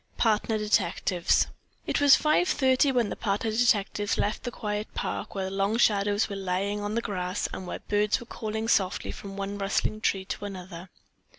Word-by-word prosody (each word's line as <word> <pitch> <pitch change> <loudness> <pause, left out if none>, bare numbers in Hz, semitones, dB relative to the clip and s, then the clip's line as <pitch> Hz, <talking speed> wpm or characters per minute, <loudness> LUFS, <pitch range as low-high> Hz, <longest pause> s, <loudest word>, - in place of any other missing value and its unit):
PARTNER 220 0 +2
DETECTIVES 205 -4 +2 0.4
It - - 0
was 285 -1 +8
five 305 +4 +2
thirty 265 0 +3
when 240 -5 +1
the - - -4
partner 210 +1 -1
detectives 210 -3 +1
left 210 - -1
the - - -1
quiet 210 -1 -4
park, - - -4
where 190 -1 -2
long 195 +3 0
shadows 205 -2 +3
were 200 - -5
lying 195 +2 -1
on 205 +1 -3
the 235 - 0
grass 180 -1 -2
and 185 - -6
where - - -4
birds 210 +2 +2
were 240 - -10
calling 220 -1 -4
softly 190 -4 +1
from 195 -1 -9
one 200 +1 -4
rustling 205 +2 -1
tree 195 -3 0
to 200 - -5
another. 185 -2 -8
205 Hz, 180 wpm, -27 LUFS, 195-220 Hz, 0.4 s, was